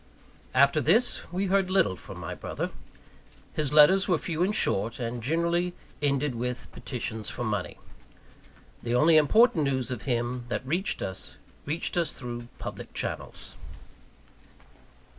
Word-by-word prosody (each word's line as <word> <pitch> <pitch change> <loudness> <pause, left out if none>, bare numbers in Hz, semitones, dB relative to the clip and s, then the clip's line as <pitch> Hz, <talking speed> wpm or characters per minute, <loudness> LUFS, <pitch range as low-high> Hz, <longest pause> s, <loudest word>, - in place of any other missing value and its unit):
After 140 +3 +5
this, 205 - +2
we 185 +3 -1
heard 195 -1 +2
little 185 - +3
from - - -10
my - - -5
brother. - - -4 0.8
His 150 -2 -1
letters 155 +6 +6
were 180 -4 +3
few 165 0 -3
and 200 +4 +2
short, 110 - +1
and 120 0 -3
generally 170 +6 0 0.3
ended 140 -1 +1
with 125 +1 -4
petitions 110 -4 -4
for 120 - -5
money. 105 -5 -2 1.0
The 120 0 -1
only 155 +5 +5
important 160 - +5
news 130 -2 -1
of 125 - -5
him 120 -1 -1
that 120 +1 -3
reached 170 +8 0
us, 95 0 -5 0.3
reached 160 +4 -1
us 170 -2 +1
through 120 -2 -6
public - - -8
channels. - - -4
140 Hz, 140 wpm, -28 LUFS, 120-175 Hz, 1.0 s, letters